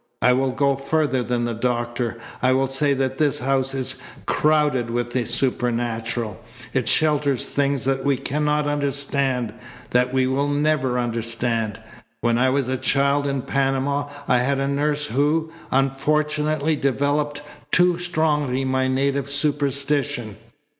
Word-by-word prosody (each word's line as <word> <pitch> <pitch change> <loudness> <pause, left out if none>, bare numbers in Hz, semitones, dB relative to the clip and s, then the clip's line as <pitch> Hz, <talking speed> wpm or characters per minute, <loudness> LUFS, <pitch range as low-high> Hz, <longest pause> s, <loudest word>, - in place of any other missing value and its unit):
I 125 - +4
will 130 +1 +1
go 140 +1 +1
further 140 -1 0
than 120 0 -1
the 120 - -2
doctor. 120 0 -2 0.2
I 130 +1 +3
will 135 +1 +2
say 140 +2 +1
that 135 0 -2
this 150 -3 +2
house 135 +1 0
is 130 -1 -1 0.2
crowded 150 -6 +2
with 120 0 -2
the 125 -1 -1
supernatural. 120 -3 -1 0.3
It 130 -3 +1
shelters 150 -4 +2
things 140 -2 -1
that 135 0 0
we 140 -2 +2
cannot 150 +2 0
understand, 140 -4 0 0.4
that 125 0 +2
we 130 0 +2
will 135 +2 0
never 145 -3 +1
understand. 115 -2 -1 0.4
When 120 0 +2
I 130 +1 +4
was 135 -1 0
a 130 0 -1
child 140 +2 +2
in 135 -2 -2
Panama 140 +1 0 0.2
I 125 - +4
had 135 +2 0
a 135 - 0
nurse 145 +1 0
who, 150 +4 0 0.2
unfortunately, 150 +3 +1
developed 145 +2 0 0.3
too 180 -1 +4
strongly 150 -6 0
my 130 0 +1
native 140 +1 0
superstition. 140 -4 0
135 Hz, 140 wpm, -22 LUFS, 125-145 Hz, 0.4 s, I